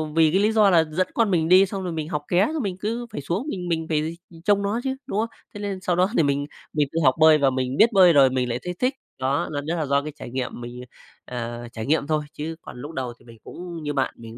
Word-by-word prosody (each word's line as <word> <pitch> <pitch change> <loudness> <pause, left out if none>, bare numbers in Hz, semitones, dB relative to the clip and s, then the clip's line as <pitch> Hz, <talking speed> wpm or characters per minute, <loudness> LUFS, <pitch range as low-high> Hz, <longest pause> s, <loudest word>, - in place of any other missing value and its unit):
Vì 160 -2 +5
cái 190 - +3
lý 215 +2 +3
do 215 -2 +5
là 170 -3 +5
dẫn 185 +4 +1
con 225 -4 +2
mình 165 -2 +1
đi, 185 +2 +7
xong 195 0 -5
rồi 180 - -3
mình 155 0 -4
học 150 -3 -2
ké, 185 +4 +3
xong 310 - -2
mình 195 -3 -2
cứ 230 +4 -3
phải - - -5
xuống 185 - -3
mình 180 -8 -4
mình 165 -1 -1
phải 160 +2 -1 0.3
trông 205 -1 +3
nó 205 +4 -1
chứ, 265 0 -1
đúng 205 - -1
không? 230 +1 0 0.2
Thế 205 - -8
nên 200 -2 -4
sau 175 -2 0
đó 185 +2 +3
thì - - +5
mình 140 0 0 0.3
mình 150 -2 +2
tự 165 - -1
học 130 -1 +5
bơi 155 -1 +7
và 140 -2 +3
mình 130 0 -2
biết 230 +2 +6
bơi 185 -3 +7
rồi 135 -3 +6
mình 125 -1 -1
lại 120 +1 -2
thấy 180 0 -3
thích, 255 +2 +1 0.3
đó, 135 +2 0
nên 145 0 -3
đó 165 - -1
là 160 -3 -1
do 140 +1 +2
cái 150 - -6
trải - - -9
nghiệm 130 -1 -4
mình, 120 +1 -7 0.4
ờ, 120 -1 -5
trải 110 -1 -5
nghiệm 150 0 +1
thôi, 155 -1 0
chứ 160 +2 -5
còn - - -10
lúc 145 - -7
đầu 130 -6 -4
thì - - -22
mình 115 -1 -14
cũng 170 -2 -8
như 145 -1 -2
bạn, 135 -2 0
mình 115 0 -10
160 Hz, 290 wpm, -24 LUFS, 140-190 Hz, 0.4 s, đi